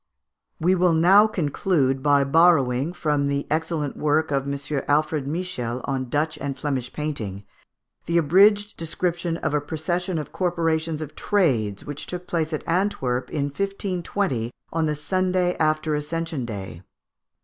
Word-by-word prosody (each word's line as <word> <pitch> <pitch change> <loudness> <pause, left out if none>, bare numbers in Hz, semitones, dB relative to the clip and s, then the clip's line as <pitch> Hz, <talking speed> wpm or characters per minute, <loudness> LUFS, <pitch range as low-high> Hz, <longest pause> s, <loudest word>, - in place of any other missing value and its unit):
We 180 +4 +3
will 180 -2 +3
now 190 +6 +6
conclude 145 -6 0
by 145 0 +4
borrowing, 140 -2 +3
from 150 -5 0
the 140 0 -1
excellent 155 -2 -1
work 150 +1 +1
of 140 0 0
M. 140 0 -2
Alfred 150 -1 +1
Michiels 145 -7 -3
on 130 -2 -2
Dutch 155 +4 -1
and 140 -1 -4
Flemish 130 -3 -2
painting, 110 -11 -4 0.6
the 170 - +2
abridged 205 +6 +4
description 170 +1 -2
of 155 - -2
a 150 - +2
procession 170 +4 -2
of 150 - -5
corporations 165 -3 0
of 150 - -9
trades, 120 - +1
which 145 0 -6
took 180 0 -5
place 165 -2 -1
at 155 - -4
Antwerp 165 -9 0
in 145 - -1
1520, 180 - -2 0.2
on 160 -1 +1
the 150 - 0
Sunday 185 +3 0
after 155 0 +1
Ascension 150 -2 -3
Day. 95 -6 -7
155 Hz, 145 wpm, -24 LUFS, 140-175 Hz, 0.6 s, now